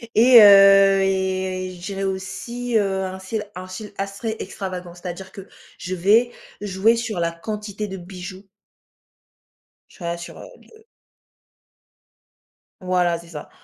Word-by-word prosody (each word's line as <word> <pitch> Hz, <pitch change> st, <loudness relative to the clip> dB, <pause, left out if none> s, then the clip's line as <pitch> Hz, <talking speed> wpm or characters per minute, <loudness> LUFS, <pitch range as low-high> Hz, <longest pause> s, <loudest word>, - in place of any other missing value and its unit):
et 235 Hz, +1 st, +8 dB
heu, 195 Hz, -1 st, +7 dB
et, 190 Hz, -1 st, -2 dB
je 175 Hz, -, -9 dB
dirais 195 Hz, -1 st, -4 dB
aussi, 195 Hz, +6 st, -4 dB
heu, 195 Hz, -2 st, 0 dB
un 190 Hz, 0 st, -6 dB
style, 210 Hz, +3 st, -4 dB
un 185 Hz, +1 st, -7 dB
style 200 Hz, +3 st, -9 dB
assez 200 Hz, +3 st, -4 dB
extravagant, 180 Hz, -3 st, -6 dB
c'est-à-dire 180 Hz, +2 st, -8 dB
que 195 Hz, 0 st, -11 dB, 0.3 s
je 185 Hz, -, -5 dB
vais 215 Hz, +7 st, +3 dB, 0.3 s
jouer 205 Hz, +3 st, +2 dB
sur 230 Hz, -5 st, -3 dB
la 170 Hz, 0 st, 0 dB
quantité 210 Hz, +4 st, -6 dB
de 190 Hz, -1 st, -7 dB
bijoux 185 Hz, +1 st, -10 dB, 1.4 s
tu -, -, -20 dB
vois? 170 Hz, 0 st, -3 dB
Sur, 170 Hz, -, -10 dB
heu, -, -, -10 dB
le 445 Hz, 0 st, -21 dB, 2.0 s
Voilà, 180 Hz, -2 st, +1 dB
c'est 170 Hz, -, -15 dB
ça. 150 Hz, -3 st, -9 dB
190 Hz, 135 wpm, -22 LUFS, 185-210 Hz, 2.0 s, et